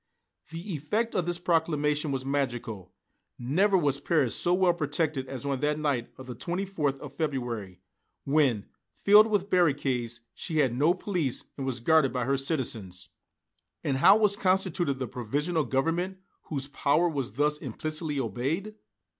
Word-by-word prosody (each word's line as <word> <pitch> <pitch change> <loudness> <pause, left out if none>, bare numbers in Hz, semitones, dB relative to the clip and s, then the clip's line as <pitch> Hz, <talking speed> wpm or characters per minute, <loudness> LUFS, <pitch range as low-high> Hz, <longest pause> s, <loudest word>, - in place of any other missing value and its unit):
The 170 +5 -6
effect 210 +11 -1
of 175 -2 0
this 175 0 0
proclamation 155 -3 +1
was 135 -1 -3
magical. 120 -9 -3 0.5
Never 190 +11 +2
was 145 -5 +1
Paris 145 -5 +1
so 175 - +1
well 180 -1 +4
protected 145 -3 -1
as 135 +1 -6
on 140 -2 -1
that 150 +1 0
night 140 -6 -1
of 130 - -10
the 125 - -6
24th 170 - -2
of 140 -1 -9
February, 120 - -3 0.4
when, 135 -7 +2 0.3
filled 210 +2 +6
with 205 -2 -1
barricades, 135 -9 +1
she 160 - -4
had 135 -6 +3
no 150 +8 +3
police 180 -9 -2
and 135 -1 -4
was 125 -2 -2
guarded 155 +1 +4
by 125 -1 -1
her 135 +2 +2
citizens. 120 - -3 0.7
And 135 -2 0
how 195 +9 +7
was 210 -2 +3
constituted 185 -6 +1
the 130 - -3
Provisional 145 +8 -1
Government 165 +9 -1 0.3
whose 140 -3 -4
power 145 +4 +2
was 140 -9 -3
thus 150 +4 +1
implicitly 155 +2 -3
obeyed? 135 - -2
145 Hz, 155 wpm, -28 LUFS, 130-175 Hz, 0.7 s, how